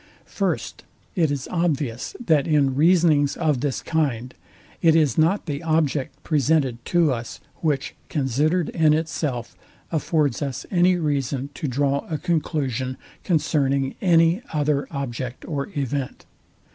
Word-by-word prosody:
First, - - -3 0.3
It 165 -5 +2
is 140 -2 -3
obvious, 150 -9 -1
that 160 - +2
in 145 -4 +3
reasonings 155 -1 +3
of 150 -6 +1
this 140 -3 -2
kind, 130 -7 -1 0.5
it 165 -2 +5
is 150 -7 +3
not 165 +6 +2
the 145 -3 -3
object 155 -4 -1
presented 140 -5 +1
to 170 -5 +3
us, 115 -1 -6 0.2
which, 145 -4 -1 0.2
considered 150 +5 +1
in 155 -3 +3
itself, 155 -6 -3 0.4
affords 155 -5 0
us 140 -3 -3
any 180 0 +4
reason 140 -4 -1
to 150 - -4
draw 140 +2 0
a 155 - -1
conclusion 140 -7 -1 0.3
concerning 140 -5 +1
any 170 +1 +4
other 150 -2 0
object 130 -3 -5
or 140 0 -3
event. 140 -1 -3
145 Hz, 130 wpm, -23 LUFS, 135-160 Hz, 0.5 s, it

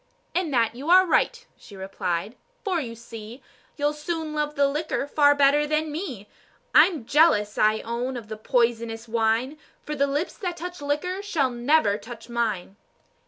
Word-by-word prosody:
"In 355 -2 0
that 235 -5 +1
you 270 +7 -6
are 370 +1 +7
right," 470 +7 +1
she 205 - -15
replied; 190 +1 -3 0.3
"for, 370 -6 0
you 230 -4 -6
see, 230 +1 -10 0.3
You'll 295 0 +1
soon 310 +1 -4
love 300 0 -2
the 280 -1 +3
liquor 295 0 -2
far 290 0 +4
better 285 +1 +4
than 305 +1 0
me. 285 - -5 0.5
I'm 315 -11 +5
jealous, 225 -8 +3
I 215 +1 +3
own, 245 +3 -3
of 230 -3 -8
the 215 - -6
poisonous 230 0 0
wine, 230 +6 0 0.2
For 300 - -5
the 280 -1 +1
lips 290 +5 -2
that 360 -5 -3
touch 355 0 -7
liquor 300 +7 -2
shall 315 -11 0
never 240 -3 +2
touch 230 +2 -11
mine." 215 -5 -2
275 Hz, 165 wpm, -25 LUFS, 230-310 Hz, 0.5 s, are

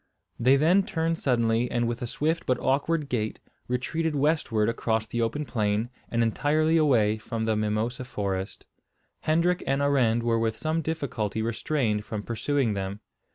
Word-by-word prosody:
They 130 +3 +5
then 165 +8 +4
turned 165 -3 -1
suddenly, 120 -2 +1
and 120 -1 0
with 120 0 -3
a 120 - -2
swift 160 +7 -1
but 130 -1 +2
awkward 145 +3 +1
gait 110 -5 -2 0.3
retreated 150 +6 -1
westward 140 -7 +1
across 115 -1 0
the 120 +1 -3
open 130 +7 -1
plain, 110 -1 -1 0.2
and 115 0 +1
entirely 155 +7 +2
away 115 -9 +3
from 110 0 -3
the 110 -1 +1
mimosa 110 +4 -1
forest. 100 -5 -4 0.5
Hendrik 170 +3 +1
and 135 +1 +1
Arend 130 -5 +2
were 115 -1 +2
with 110 -1 -1
some 160 +1 -1
difficulty 125 -9 -2
restrained 115 -1 0
from 105 -1 -5
pursuing 120 +1 0
them. 100 +1 -4
120 Hz, 155 wpm, -27 LUFS, 110-145 Hz, 0.5 s, They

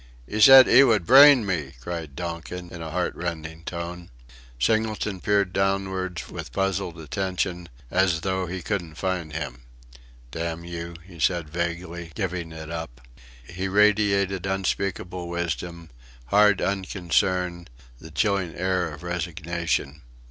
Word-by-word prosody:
"'Ee 110 - -3
said 135 +3 +10
'ee 135 - +8
would 110 -9 +3
brain 135 - +8
me!" 75 -9 -2
cried 80 0 -6
Donkin 85 +1 -6
in 85 - -8
a 80 - -5
heartrending 85 -2 -4
tone. 85 0 -6 0.5
Singleton 110 - 0
peered 100 -2 +1
downwards 95 -2 -1
with - - -8
puzzled 95 -3 -2
attention, 90 +1 -3 0.2
as 90 -4 +2
though 95 0 -1
he 90 0 -5
couldn't 90 -7 -3
find 90 -2 -2
him. 70 -5 -5 0.7
"Damn 85 +1 -4
you!" 85 0 -6
he 90 -3 -14
said, 85 -2 0
vaguely, 85 0 -4
giving 90 -5 -3
it 80 0 -8
up. 80 -8 -6 0.4
He 90 +8 -5
radiated 100 -2 +2
unspeakable 95 -2 -2
wisdom, 85 -1 -4 0.4
hard 105 -1 +4
unconcern, 90 -2 0 0.3
the 80 - -11
chilling 90 +5 0
air 90 -2 0
of 75 +2 -10
resignation. 85 -3 -3
90 Hz, 125 wpm, -25 LUFS, 85-95 Hz, 0.7 s, said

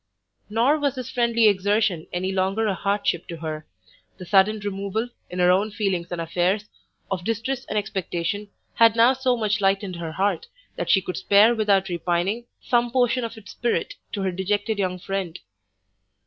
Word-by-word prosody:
Nor 240 +8 +2
was 285 -2 0
this 255 -1 -6
friendly 235 -2 +3
exertion 205 -3 +1
any 185 +2 -2
longer 195 +3 0
a 205 - +1
hardship 200 -2 -1
to 170 - -6
her; 155 -1 -6 0.5
the 185 - -9
sudden 200 +3 +3
removal, 200 +3 -3 0.2
in 180 - -7
her 180 0 +5
own 195 +4 +2
feelings 195 -5 -2
and 175 - -3
affairs, 180 +5 0 0.5
of 185 -2 -2
distress 230 +5 -2
and 210 - -3
expectation, 195 0 -2 0.3
had 230 -1 +5
now 235 +3 +6
so 260 -1 0
much 210 -2 0
lightened 195 -2 +1
her 165 -2 -5
heart, 205 - 0 0.3
that - - -4
she 195 - +4
could 180 - -4
spare 210 +4 +5
without 200 -4 +2
repining, 180 +6 -1 0.2
some 240 -1 +2
portion 245 0 +1
of 230 -1 -5
its 205 -3 -11
spirit 240 0 -1 0.2
to 200 - -2
her 190 - 0
dejected 205 +3 -1
young 185 -2 -1
friend. 190 -2 -4
200 Hz, 175 wpm, -24 LUFS, 185-225 Hz, 0.5 s, now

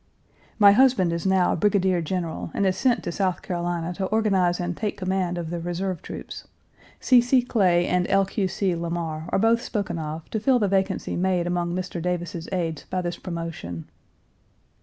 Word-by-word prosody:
My 205 -2 +8
husband 210 -7 +4
is 170 +3 -2
now 190 -1 +3
brigadier 190 -1 +2
general 165 -1 -3
and 200 - +1
is 185 -1 +2
sent 250 -3 +1
to - - -3
South 185 0 -1
Carolina 175 -1 -2
to 190 +1 -2
organize 195 -5 +2
and 175 0 -2
take 210 +1 -3
command 185 -2 -1
of 170 -1 -4
the 175 - -3
reserve 175 +2 -3
troops. - - -8 0.5
C. 250 -2 +5
C. 245 +1 +3
Clay 185 -8 +2
and 180 0 +1
L. 195 0 +4
Q. 195 0 -1
C. 185 -1 -1
Lamar 165 -1 -4
are - - +1
both 225 +3 +3
spoken 200 -8 -3
of 155 +1 -5
to 220 - -1
fill 255 +4 +3
the 210 -4 +1
vacancy 190 0 0
made 180 -1 +1
among 175 0 -1
Mr. 180 -2 -4
Davis's 175 -1 -3
aides 165 -5 -2
by 185 -1 -2
this 175 -1 -4
promotion. 165 - -6
180 Hz, 180 wpm, -24 LUFS, 170-195 Hz, 0.5 s, My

